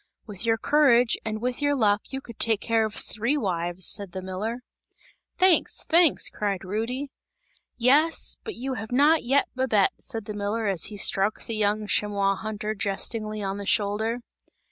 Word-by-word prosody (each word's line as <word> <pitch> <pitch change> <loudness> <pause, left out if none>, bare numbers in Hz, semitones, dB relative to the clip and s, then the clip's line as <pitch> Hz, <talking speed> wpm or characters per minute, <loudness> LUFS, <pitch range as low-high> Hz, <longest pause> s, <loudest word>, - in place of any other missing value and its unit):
"With 205 -3 -8
your 225 0 +3
courage 250 -4 +4
and 215 -1 -3
with 250 +2 -2
your 285 0 +2
luck 210 -5 +2
you 270 0 -4
could 235 -5 -12
take 220 -3 +2
care 225 -1 +1
of 215 - -5
three 235 +7 -2
wives!" 175 -5 -2
said 200 -3 -2
the 190 - -5
miller. 215 +6 -4 0.7
"Thanks! 370 -2 +3
Thanks!" 335 -2 +4
cried 200 -3 -3
Rudy. 240 +8 -3 0.7
"Yes, 285 +7 +4
but 435 - -6
you 265 +2 -4
have 220 -1 -6
not 295 +5 +4
yet 270 +4 +2
Babette!" 240 -7 +2
said 225 -5 -5
the 210 - -5
miller 205 +2 -2
as 195 -5 0
he 210 - -7
struck 195 +1 +2
the 225 - -4
young 210 0 0
chamois 200 -1 +1
hunter, 215 +1 -4
jestingly 215 +1 -3
on 195 +1 -3
the 200 - -6
shoulder. 220 +4 0
220 Hz, 170 wpm, -25 LUFS, 205-250 Hz, 0.7 s, courage